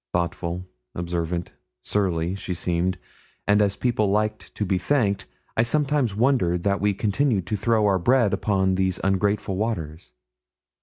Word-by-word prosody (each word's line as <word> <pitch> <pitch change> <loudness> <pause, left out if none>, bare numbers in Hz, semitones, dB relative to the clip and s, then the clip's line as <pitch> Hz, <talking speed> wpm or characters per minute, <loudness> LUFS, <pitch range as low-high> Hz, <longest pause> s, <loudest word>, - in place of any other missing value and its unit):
Thoughtful, 85 +1 -2 0.3
observant, 85 0 -3 0.3
surly, 90 -4 0
she 95 -2 -4
seemed; 90 +2 0 0.5
and 105 +1 +4
as 100 -1 +2
people 110 -4 +1
like 105 +2 +1 0.2
to 105 - -1
be 95 -1 +1
thanked, 100 -4 +1 0.3
I - - +4
sometimes 135 -2 +1
wonder 110 -7 +2
that 100 +3 0
we 100 -1 +2
continued 105 -1 +1
to 105 - -2
throw 110 +1 +2
our 95 -2 +3
bread 120 +2 +3
upon 95 -1 +1
these 95 -1 0
ungrateful 95 0 +1
waters. 80 - -3
100 Hz, 145 wpm, -24 LUFS, 90-110 Hz, 0.5 s, and